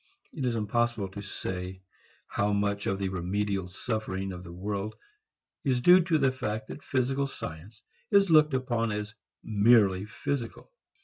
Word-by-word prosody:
It 140 -5 -3
is 120 -2 +1
impossible 115 -1 0
to 100 +2 -7
say 95 -1 -5 0.4
how 105 +1 0
much 100 0 0
of 100 - 0
the 95 -1 -1
remediable 95 +1 -1
suffering 95 -1 -3
of 90 0 -8
the 85 - -9
world 100 +4 -4 0.7
is 130 -4 +2
due 180 +8 +7
to 165 -2 +3
the 135 -3 +3
fact 110 -4 -4
that - - -7
physical 135 +1 0
science 105 0 -8 0.3
is 200 -3 +4
looked 150 -3 +6
upon 120 -3 0
as 105 +1 -4 0.3
merely 105 -3 +4
physical. 115 - -4
105 Hz, 150 wpm, -29 LUFS, 95-125 Hz, 0.7 s, due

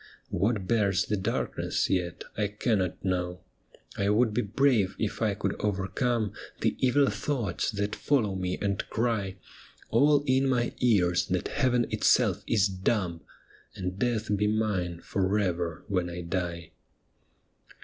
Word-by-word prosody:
What 100 +1 0
bears 100 -4 +2
the 105 - 0
darkness 95 - -1
yet 90 -2 -1
I 105 -1 0
cannot 100 -3 -1
know; 90 -1 -1 0.5
I 100 0 0
would 110 +1 +3
be 120 - +1
brave 105 -3 +2
if 110 - -3
I 105 -3 +1
could 100 0 -2
overcome 105 +2 0 0.3
The - - +1
evil 135 +2 +3
thoughts 120 -12 -2
that 105 -1 -2
follow 115 -9 +1
me 90 -1 -2
and 100 -1 -1
cry, 110 -5 -1 0.6
All 145 +5 +4
in 130 0 +3
my 120 -2 +1
ears, 90 -8 +3
that 90 -1 -1
Heaven 125 -4 +2
itself - - +3
is 105 -3 +3
dumb, 95 -3 -1 0.5
And 95 0 -4
death 110 -3 0
be 105 +1 +1
mine 100 -6 -1
for 95 +3 0
ever 85 -4 -1
when 90 -4 0
I 90 0 -5
die.' 85 -1 -3
100 Hz, 140 wpm, -28 LUFS, 90-115 Hz, 0.6 s, All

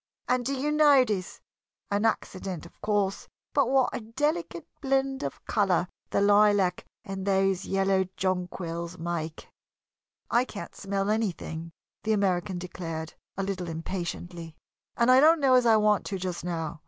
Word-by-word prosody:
And 250 0 +1
do 275 +3 -1
you 285 +3 -1
notice 265 -11 +3 0.5
an 205 +2 +1
accident, 185 -6 -2
of 170 - -17
course 205 -2 0 0.3
but 275 -4 +3
what 265 -1 +3
a - - -2
delicate 300 +9 -2 0.2
blend 270 -1 0
of 140 - -5
color 190 -5 +2 0.2
the - - +1
lilac 205 -3 +4 0.2
and 195 -1 -5
those 195 -1 +1
yellow 195 -1 +2
jonquils 180 -2 -3
make!" 165 -2 -4 0.8
"I 240 +1 +4
can't 215 -5 -8
smell 195 +1 -1
anything," 170 -6 -2 0.3
the 220 +1 +1
American 190 -2 0
declared, 165 -2 -6 0.2
a 195 - -1
little 185 -3 -3
impatiently, 170 0 -5 0.4
"and 235 +2 +4
I 255 - +8
don't 320 +3 +6
know 270 -3 +4
as 250 -2 +5
I 225 - +6
want 210 -1 +2
to 195 - -3
just 180 -2 -4
now. 165 -2 -3
195 Hz, 150 wpm, -28 LUFS, 175-235 Hz, 0.8 s, I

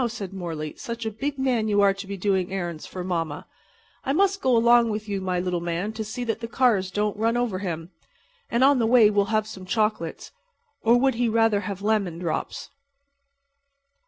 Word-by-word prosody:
said 205 -5 -6
Morley. 165 -5 -5
"Such 235 -1 -5
a 220 - -1
big 275 +7 -3
man 250 -5 +1
you 205 -1 +3
are 200 -1 +5
to 195 0 -8
be 200 0 -5
doing 190 -1 0
errands 175 -4 -4
for 185 - -6
mamma. 165 -5 -3 0.6
I 270 - 0
must 395 +4 +2
go 255 -2 +3
along 235 0 +5
with 215 0 -4
my 190 -3 -1
little 180 -1 -1
man 175 +5 -2
to 220 0 -4
see 215 +4 -5
that 225 -2 -2
the 230 - -5
cars 230 -7 +2
don't 205 +2 -1
run 230 +2 +1
over 235 -6 -1
him. 170 -3 -5 0.6
And 235 +2 +2
on 275 -1 +5
the 225 - +2
way 225 -3 +6
we'll 205 -1 +2
have 215 +1 0
some 215 -3 -9
chocolates. 215 -5 -1 0.5
Or 235 +2 +4
would 265 +1 +3
he 235 0 0
rather 225 -2 +3
have 200 -1 -6
lemon 205 -6 0
drops?" 170 -3 -4
210 Hz, 195 wpm, -25 LUFS, 185-230 Hz, 0.6 s, way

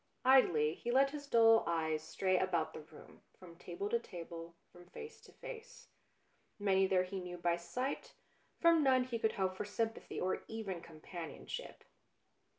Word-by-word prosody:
Idly 170 - +5
he 235 - -6
let 270 +3 +4
his 285 -1 -7
dull 225 -3 +6
eyes 160 -2 0
stray 185 -1 0
about 175 -4 +1
the - - -7
room, 155 0 -15 0.2
from 175 -2 -13
table 180 +3 -5
to 235 - +2
table, 170 -4 -8 0.2
from 175 0 -15
face 450 - -10
to - - -16
face. - - -10 0.7
Many 195 -2 +3
there 185 -1 +3
he 190 +1 -5
knew 180 -1 -6
by 170 0 +1
sight, 210 +11 -4 0.4
from 335 -1 +5
none 260 -3 +4
could 230 -2 -3
he - - -11
hope 190 -1 0
for - - -3
sympathy 225 +2 -3
or 185 - -1
even 205 -6 -5
com 155 -2 -13
panionship. 170 -2 -7
190 Hz, 165 wpm, -35 LUFS, 170-240 Hz, 0.7 s, dull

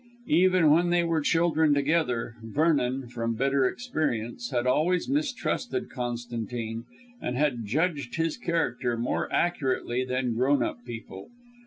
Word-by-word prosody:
Even 180 -2 +5
when 170 +3 +4
they 175 0 +3
were 165 -2 +1
children 160 -1 +3
together, 140 -6 0
Vernon 135 0 +1
from 115 -1 -3
bitter 135 +2 +2
experience 120 - -3
had 120 -1 -1
always 165 +8 +2
mistrusted 265 -3 -1
Constantine, 120 -2 -4 0.4
and 125 - -2
had 130 -6 0
judged 145 - -1
his 165 -1 0
character 150 -8 -1
more 120 +2 -1
accurately 130 -6 0
than 125 -1 -1
grown 130 +5 +2
up 120 - -4
people. 115 -5 -8
135 Hz, 130 wpm, -27 LUFS, 120-165 Hz, 0.4 s, Even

